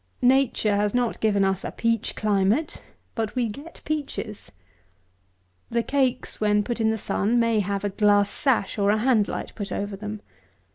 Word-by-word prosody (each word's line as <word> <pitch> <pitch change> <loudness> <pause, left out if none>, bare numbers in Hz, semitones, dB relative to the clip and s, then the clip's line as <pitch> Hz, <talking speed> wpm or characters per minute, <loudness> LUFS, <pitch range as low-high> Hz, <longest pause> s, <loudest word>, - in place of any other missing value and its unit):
Nature 250 -5 +3
has 205 +2 0
not 245 -2 0
given 205 -2 +2
us 190 -1 0
a - - -3
peach 230 -1 -1
climate; 210 +8 0 0.3
but 220 -1 -3
we 245 -2 +1
get 285 +10 -10
peaches. 285 -8 -4 1.2
The 235 0 0
cakes, 260 -4 -1
when 210 -1 +3
put 235 +1 -3
in 220 - +3
the 220 - 0
sun, 220 +3 0
may 230 -2 +2
have 200 0 -2
a 205 - 0
glass 205 0 +3
sash, 245 -7 0
or 200 0 +3
a 210 - +3
hand 220 -2 +3
light, - - -5
put 205 -1 -6
over 205 0 -3
them. 210 +1 -7
215 Hz, 175 wpm, -25 LUFS, 205-240 Hz, 1.2 s, Nature